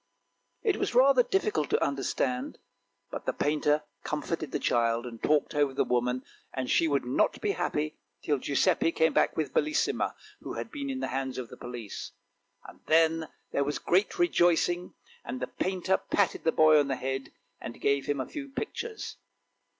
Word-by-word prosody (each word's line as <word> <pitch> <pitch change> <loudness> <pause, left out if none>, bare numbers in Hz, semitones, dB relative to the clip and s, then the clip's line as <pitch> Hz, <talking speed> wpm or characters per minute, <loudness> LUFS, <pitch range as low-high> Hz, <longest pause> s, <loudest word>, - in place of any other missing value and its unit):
It 420 -5 +2
was - - -2
rather 260 0 +7
difficult 190 - 0
to - - +2
understand; 135 -2 -1 0.5
but - - -6
the - - +1
painter 150 0 +1 0.2
comforted 155 +1 -3
the - - 0
child 115 0 +1
and 115 -2 -8
talked 150 -1 +2
over 145 -2 +1
the - - +3
woman, 125 +1 0 0.3
but 130 -1 -2
she 165 - +4
would 140 -4 +1
not 125 - +1
be 415 - 0
happy 155 - -2 0.2
till 145 -3 +1
Giuseppe 165 +5 +2
came 160 0 +3
back - - +2
with 155 -2 -1
Bellissima, 310 +1 +1 0.2
who - - -6
had - - -5
been 285 -3 -4
in 265 -1 -3
the - - -2
hands 130 0 -3
of 125 -3 -5
the - - -10
police. 120 -4 -7 0.7
Then 160 0 +3 0.2
there 140 - +1
was 145 +1 -2
great 190 - +1
rejoicing, 175 - +2 0.3
and 130 - -5
the 125 - -1
painter 190 +5 0
patted 200 -3 0
the 160 - +4
boy 155 -1 +6
on 145 - +2
the 135 - 0
head, 135 +1 -4 0.3
and 120 - -8
gave 140 -1 +1
him 145 -1 0
a 130 - -1
few 280 -2 -7
pictures. 435 +8 -5
150 Hz, 175 wpm, -29 LUFS, 135-185 Hz, 0.7 s, rather